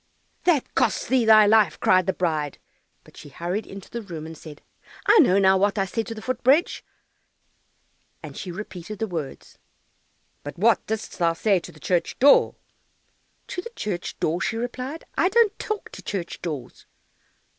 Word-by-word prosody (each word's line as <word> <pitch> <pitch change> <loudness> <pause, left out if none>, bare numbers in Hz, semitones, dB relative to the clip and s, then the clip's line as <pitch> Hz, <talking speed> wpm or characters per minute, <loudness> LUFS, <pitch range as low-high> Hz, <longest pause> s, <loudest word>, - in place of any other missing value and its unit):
"That 325 -7 +2
costs - - +1
thee 255 -3 +2
thy 215 -1 +7
life!" 205 -6 +3
cried 185 0 +3
the - - +3
bride, 155 -5 -2 0.5
but - - -19
she 145 - -12
hurried 175 +9 -4
into 195 0 -10
the 235 - -6
room, 170 -7 -8
and 160 0 -8
said, 155 -2 -12 0.4
"I 455 - +6
know 195 - +5
now 190 -1 +4
what 200 +1 +1
I 195 - +1
said 225 +3 -3
to 225 - -6
the 215 - -9
foot 255 +1 -3
bridge," 280 +7 +3 1.4
and - - -9
she 185 - -6
repeated 190 +1 -8
the 220 - -1
words. 165 -9 -7 0.8
"But 145 +4 -8
what 225 +5 +3
didst 220 -1 -5
thou 170 -1 +2
say 195 +3 +2
to - - -11
the - - -18
church 175 -2 -1
door?" 280 +2 +5 0.9
"To 360 - -4
the 470 - -8
church 185 -4 -4
door?" 170 +3 -1
she 225 - -1
replied; 255 +6 -5 0.2
"I 360 - +4
don't 435 0 +3
talk 430 -1 -4
to - - -10
church 185 -4 -5
doors." 145 -8 -7
200 Hz, 175 wpm, -24 LUFS, 170-235 Hz, 1.4 s, thy